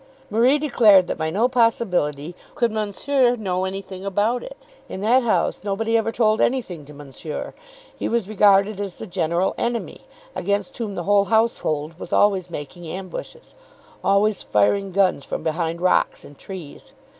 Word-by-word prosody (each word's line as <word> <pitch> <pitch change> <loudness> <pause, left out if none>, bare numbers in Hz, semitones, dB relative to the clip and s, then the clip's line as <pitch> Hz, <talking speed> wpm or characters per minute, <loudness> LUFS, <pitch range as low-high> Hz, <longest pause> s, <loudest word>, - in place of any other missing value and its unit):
Marie 240 +7 +4
declared 225 -10 +5
that - - -3
by 160 0 -1
no 210 +9 +2
possibility 180 - 0 0.2
could 235 -2 +1
Monsieur 240 +5 +1
know 190 -5 -2
anything 190 0 -6
about 205 +5 0
it. - - -9 0.3
In 190 - -6
that 240 +5 +4
house 235 -4 0
nobody 220 +3 -1
ever 225 0 +1
told 220 -1 +2
anything 195 - -1
to 150 - -13
Monsieur. 145 +2 -7 0.4
He - - -3
was 230 -4 0
regarded 205 -1 +3
as 200 -3 -4
the - - -8
general 175 -1 0
enemy, 235 -1 -3 0.3
against 200 +7 -2
whom 210 -4 -3
the 175 - -3
whole 200 +2 +3
household 170 -8 0
was - - -7
always 195 -3 +2
making 170 +2 -8
ambushes, 190 - -8 0.5
always 200 +1 +2
firing 190 - +1
guns 185 -6 +2
from - - -5
behind 165 +1 -2
rocks 185 - +1
and 145 - -13
trees. 175 -3 -10
200 Hz, 155 wpm, -22 LUFS, 175-225 Hz, 0.5 s, declared